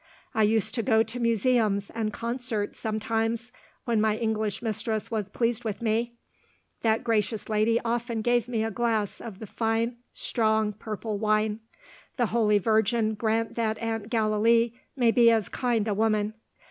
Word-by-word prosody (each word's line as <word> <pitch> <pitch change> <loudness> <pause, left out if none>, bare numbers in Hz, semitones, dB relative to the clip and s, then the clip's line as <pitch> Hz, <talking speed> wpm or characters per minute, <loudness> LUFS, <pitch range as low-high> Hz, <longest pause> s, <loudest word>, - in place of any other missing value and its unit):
I 220 - +1
used 215 0 +2
to 245 - 0
go 225 -1 +3
to 225 +3 -6
museums 225 -3 +1
and 220 -2 -2
concerts 235 -2 -3
sometimes, 225 +2 -1 0.3
when 230 -4 +2
my 215 0 +2
English 220 -1 -1
mistress 220 0 -2
was 210 -3 -2
pleased 235 +2 0
with 215 -3 -3
me. 235 +1 0 0.7
That 225 +1 +2
gracious 220 -2 0
lady 220 +2 +2
often 235 -1 -1
gave 240 -1 +2
me 230 -3 -1
a 225 - -2
glass 220 -2 -1
of 220 -5 -8
the 220 - -8
fine 225 +3 -1
strong 220 -2 0
purple 215 0 -5
wine. 215 0 +1 0.6
The 245 - +3
Holy 215 -3 +4
Virgin 220 +2 +2
grant 225 +1 0
that 220 -1 0
Aunt 225 -1 -3
Gallilee 230 +1 +3 0.2
may 240 -4 +3
be 235 -1 +6
as 225 -3 +2
kind 235 -4 0
a 210 - +1
woman! 215 0 +1
225 Hz, 160 wpm, -27 LUFS, 215-235 Hz, 0.7 s, be